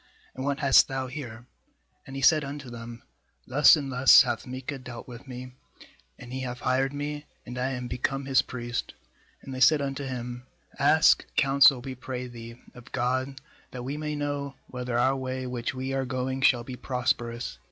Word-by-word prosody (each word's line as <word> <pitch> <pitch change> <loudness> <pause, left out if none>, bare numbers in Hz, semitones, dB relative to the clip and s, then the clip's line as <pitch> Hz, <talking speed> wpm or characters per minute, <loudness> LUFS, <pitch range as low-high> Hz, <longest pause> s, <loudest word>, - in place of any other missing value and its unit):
and 130 - -6
what 140 +1 -1
hast 135 -2 +6
thou 135 -1 -3
here? 125 -4 -8 0.3
' - - -33
4And 135 - -8
he 135 - -4
said 155 +1 +5
unto 140 -2 -7
them: 115 0 -9 0.4
'Thus 145 +6 +7
and 140 -3 -4
thus 125 -2 +8
hath 115 +2 -3
Micah 130 +2 -5
dealt 125 -2 -9
with 125 +2 -11
me, 125 0 -8 0.7
and 125 0 -10
he 130 - -3
hath 125 -1 -5
hired 130 +1 +1
me, 145 +1 -5 0.2
and 125 - -7
I 125 +1 -1
am 125 -1 -4
become 130 +3 -2
his 135 -3 +4
priest.' 120 -2 -5 0.5
&And 135 - -8
they 130 - -5
said 140 +5 +6
unto 140 0 -3
him: 125 -1 -6 0.3
'Ask 150 +3 +5
counsel, 135 -2 +5
we 130 +1 -6
pray 125 0 -6
thee, 115 -1 -10
of 125 +1 -14
God, 130 +2 -1 0.3
that 125 -1 -7
we 135 +3 -4
may 150 0 -3
know 145 -1 -3
whether 125 -1 -4
our 130 +2 +3
way 130 -1 -4
which 125 +1 -3
we 130 +1 -3
are 135 0 0
going 130 +1 -2
shall 120 -2 +4
be 125 +1 -7
prosperous.' 120 - -2
130 Hz, 190 wpm, -27 LUFS, 125-135 Hz, 0.7 s, thus